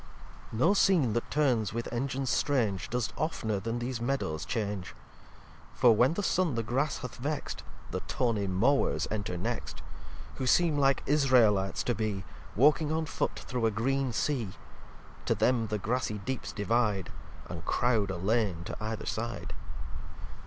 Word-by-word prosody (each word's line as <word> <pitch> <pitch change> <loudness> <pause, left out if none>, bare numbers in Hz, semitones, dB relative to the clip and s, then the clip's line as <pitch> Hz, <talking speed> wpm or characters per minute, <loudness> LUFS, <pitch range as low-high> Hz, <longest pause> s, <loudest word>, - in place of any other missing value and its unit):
xlix 110 - -5
No 165 - +4
Scene 180 - +4
that 120 - -2
turns 125 -8 +1
with 115 0 -3
Engines 130 +2 -1
strange 110 -10 +1
Does 125 -1 -1
oftner 110 -10 -1
then 115 +3 -2
these 120 0 -3
Meadows 120 -12 -1
change, 105 -5 -3 0.8
For 120 -4 +6
when 125 +9 +4
the 205 - -1
Sun 180 -8 +1
the 115 - -1
Grass 130 +6 0
hath 125 - -7
vext, 145 +4 -3 0.3
The - - -1
tawny 110 -5 0
Mowers 115 +10 +2
enter 100 -4 -2
next; - - -4 0.5
Who 130 - -2
seem 165 +3 +4
like 135 -1 +3
Israelites 120 -9 +3
to 120 - +1
be, 105 -4 -2 0.3
Walking 150 +5 +4
on 160 0 0
foot 160 - -2
through 125 -3 -1
a - - +3
green 130 +5 0
Sea. 120 -2 0 0.8
To - - +3
them 120 -3 +2
the 105 - -1
Grassy 110 +1 -1
Deeps 125 +6 -4
divide, 105 -3 0 0.4
And 85 -1 -7
crowd 115 -5 +2
a 95 - -3
Lane 100 -2 0
to - - -6
either 110 -1 -3
Side. 115 +2 -3
120 Hz, 155 wpm, -30 LUFS, 105-135 Hz, 0.8 s, For